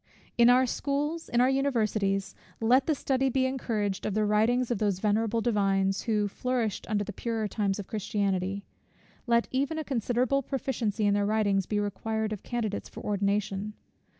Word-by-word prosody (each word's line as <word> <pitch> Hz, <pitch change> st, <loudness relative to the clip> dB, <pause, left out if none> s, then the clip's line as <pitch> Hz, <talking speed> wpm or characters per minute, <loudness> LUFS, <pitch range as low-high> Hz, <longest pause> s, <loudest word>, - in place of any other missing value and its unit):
In 235 Hz, 0 st, +6 dB
our 255 Hz, +1 st, +5 dB
schools, 290 Hz, +6 st, -2 dB
in 240 Hz, -, +2 dB
our 255 Hz, -, +4 dB
universities, 215 Hz, -8 st, 0 dB, 0.3 s
let 250 Hz, +4 st, +3 dB
the 310 Hz, -, +2 dB
study 265 Hz, 0 st, 0 dB
be 260 Hz, +1 st, +1 dB
encouraged 220 Hz, -7 st, -2 dB
of 210 Hz, -, -2 dB
the 215 Hz, 0 st, +2 dB
writings 225 Hz, +4 st, +2 dB
of 230 Hz, -, 0 dB
those 205 Hz, -3 st, +1 dB
venerable 220 Hz, +3 st, +1 dB
divines, 195 Hz, -4 st, +1 dB
who 210 Hz, -2 st, +1 dB
flourished 235 Hz, 0 st, -2 dB
in 215 Hz, -, +1 dB
the 205 Hz, 0 st, -3 dB
purer 225 Hz, 0 st, -2 dB
times 200 Hz, -2 st, -1 dB
of 205 Hz, -, -5 dB
Christianity. 200 Hz, -2 st, -1 dB, 0.6 s
Let 235 Hz, 0 st, +3 dB
even 280 Hz, +4 st, 0 dB
a 315 Hz, -, -2 dB
considerable 250 Hz, +1 st, 0 dB
proficiency 235 Hz, -6 st, -2 dB
in 205 Hz, -, +3 dB
their 205 Hz, 0 st, +1 dB
writings 205 Hz, -3 st, +1 dB
be 210 Hz, -, 0 dB
required 215 Hz, +1 st, -2 dB
of 205 Hz, -, -6 dB
candidates 230 Hz, -4 st, -3 dB
for -, -, -9 dB
ordination. 200 Hz, 0 st, -1 dB
220 Hz, 170 wpm, -28 LUFS, 205-250 Hz, 0.6 s, In